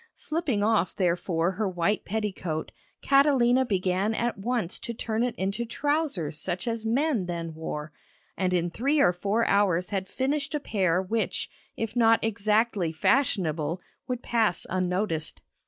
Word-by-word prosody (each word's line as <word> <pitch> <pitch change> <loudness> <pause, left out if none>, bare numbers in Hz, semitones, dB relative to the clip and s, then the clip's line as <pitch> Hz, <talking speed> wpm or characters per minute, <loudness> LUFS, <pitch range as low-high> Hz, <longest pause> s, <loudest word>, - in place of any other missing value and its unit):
Slipping 300 -10 -1
off 215 -4 +2
therefore 175 -1 +1
her 200 +1 -1
white 185 +3 0
petticoat, 190 -7 -3 0.3
Catalina 265 -3 +4
began 190 0 0
at 240 +1 0
once 220 -2 -1
to 235 - -5
turn 220 0 -2
it 245 0 0
into 195 +5 -2
trousers 235 - -1
such 180 +3 -3
as 225 -1 -2
men 245 - +1
then 170 -2 -4
wore, 155 -1 -5 0.4
and 185 -1 0
in 175 -1 0
three 280 - +1
or 180 - +5
four 205 +6 0
hours 185 -3 +2
had 195 -1 -2
finished 280 +2 -1
a - - 0
pair 190 -8 +1
which, 220 +4 -1 0.3
if 225 0 -3
not 225 -1 +5
exactly 210 -4 +1
fashionable, 165 - +1 0.3
would 250 -1 -3
pass 220 -7 +1
unnoticed. 180 -3 -1
205 Hz, 145 wpm, -27 LUFS, 180-235 Hz, 0.4 s, or